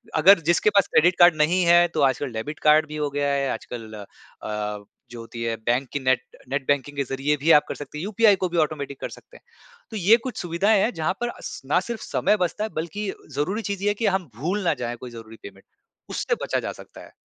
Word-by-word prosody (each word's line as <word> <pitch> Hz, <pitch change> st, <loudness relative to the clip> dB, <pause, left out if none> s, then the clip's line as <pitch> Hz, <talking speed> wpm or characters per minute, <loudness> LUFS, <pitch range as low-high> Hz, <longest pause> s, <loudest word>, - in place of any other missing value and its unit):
अगर 180 Hz, +4 st, +7 dB
जिसके 175 Hz, +4 st, +4 dB
पास 200 Hz, -2 st, +3 dB
credit 175 Hz, +3 st, +5 dB
card 175 Hz, -2 st, +7 dB
नहीं 170 Hz, +5 st, +2 dB
है, 175 Hz, 0 st, +6 dB
तो 170 Hz, -, -3 dB
आजकल 130 Hz, 0 st, -2 dB
डेबिट 145 Hz, +8 st, -5 dB
कार्ड 155 Hz, 0 st, +4 dB
भी 150 Hz, -, -8 dB
हो 150 Hz, -1 st, -1 dB
गया 145 Hz, 0 st, -1 dB
है, 140 Hz, -1 st, 0 dB
आजकल 115 Hz, -3 st, -8 dB, 0.5 s
अ, 105 Hz, -1 st, -4 dB, 0.3 s
जो 120 Hz, -, -8 dB
होती 115 Hz, 0 st, -7 dB
है, 115 Hz, -1 st, -1 dB
बैंक 125 Hz, +3 st, +1 dB
की 145 Hz, -, -1 dB
नेट 130 Hz, -1 st, +2 dB, 0.3 s
नेट 135 Hz, 0 st, -2 dB
बैंकिंग 145 Hz, 0 st, 0 dB
के 140 Hz, -, +1 dB
ज़रिए 135 Hz, +3 st, -1 dB
भी 160 Hz, +4 st, +2 dB
आप -, -, -17 dB
कर -, -, -5 dB
सकते 145 Hz, +1 st, -9 dB
हैं। 155 Hz, -, -5 dB
यूपीआई 210 Hz, 0 st, +4 dB
को 180 Hz, -, +1 dB
भी 170 Hz, -, -3 dB
ऑटोमेटिक 140 Hz, -3 st, -7 dB
कर -, -, -4 dB
सकते -, -, -14 dB
हैं। -, -, -25 dB, 0.5 s
तो 220 Hz, -, -4 dB
ये 205 Hz, +5 st, +5 dB
कुछ 245 Hz, -, -6 dB
सुविधाएँ 195 Hz, +4 st, +2 dB
हैं, 235 Hz, -, +1 dB
जहाँ 160 Hz, +3 st, -1 dB
पर 240 Hz, -, 0 dB
अस -, -, -8 dB
ना 150 Hz, +6 st, +2 dB
सिर्फ़ 235 Hz, -, -4 dB
समय 210 Hz, -, +1 dB
बचता 210 Hz, +5 st, -4 dB
है, 220 Hz, -, -2 dB
बल्कि 190 Hz, +6 st, -3 dB, 0.2 s
ज़रूरी 190 Hz, +10 st, -1 dB
चीज़ 200 Hz, 0 st, -5 dB
ये 205 Hz, -, +3 dB
है -, -, +2 dB
कि -, -, +3 dB
हम 190 Hz, -6 st, 0 dB
भूल 185 Hz, -, -2 dB
ना -, -, +4 dB
जाएँ 120 Hz, 0 st, -3 dB
कोई 125 Hz, 0 st, -9 dB
ज़रुरी 115 Hz, -1 st, -11 dB
पेमेंट। 100 Hz, -1 st, -12 dB, 0.4 s
उससे -, -, -1 dB
बचा -, -, 0 dB
जा -, -, -4 dB
सकता -, -, -13 dB
है। -, -, -19 dB
150 Hz, 245 wpm, -24 LUFS, 130-185 Hz, 0.5 s, अगर